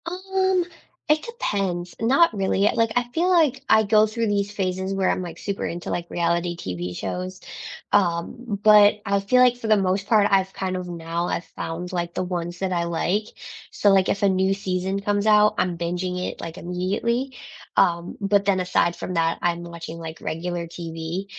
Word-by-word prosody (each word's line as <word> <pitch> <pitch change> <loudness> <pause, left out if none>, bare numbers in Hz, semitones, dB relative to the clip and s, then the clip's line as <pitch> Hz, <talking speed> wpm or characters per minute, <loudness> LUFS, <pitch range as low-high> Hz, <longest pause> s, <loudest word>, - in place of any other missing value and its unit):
Um, 375 0 0 0.4
it 305 0 +4
depends, 195 - -2
not 270 +6 +4
really, 195 0 +2
like, 230 -1 +1
I 245 0 +2
feel 345 +3 +1
like 310 -7 +3
I 220 0 +5
go 215 +1 +4
through 225 +1 -2
these 205 -1 0
phases 190 -1 -2
where 195 -1 +1
I'm, - - 0
like, 175 -2 -7
super 200 -1 -3
into, 175 +1 -5
like, 170 0 -3
reality 170 0 0
TV 90 - -5
shows, 185 - -5 0.5
um, 200 +4 0
but 210 -1 +6
I 200 0 +2
feel 225 +6 +3
like 250 -1 +5
for 230 - -5
the 215 - +5
most 195 0 0
part 210 -3 +4
I've 190 -1 +2
kind 185 -1 -3
of 180 -1 -5
now 170 0 -3
I've 175 - -2
found, 175 +2 -6
like, 175 -1 -3
the - - -2
ones 175 -1 -4
that 190 -1 -1
I 170 -1 0
like. 175 +5 0 0.5
So, 205 - +2
like, 195 -1 +4
if 200 - -1
a 200 - +5
new 190 +1 +2
season 190 0 -2
comes 205 +1 0
out, 210 0 +5
I'm 180 -2 0
binging 180 +2 -2
it, - - -15
like, 165 +1 -7
immediately, 205 +9 -2 0.4
um, 170 0 +2
but 200 0 +2
then 195 -2 +2
aside 180 -1 +1
from 180 - -5
that, 165 0 +1
I'm 175 0 0
watching, 170 -1 -8
like, 160 -1 -8
regular 175 +1 -3
TV, 165 +2 -5
190 Hz, 190 wpm, -23 LUFS, 175-210 Hz, 0.5 s, but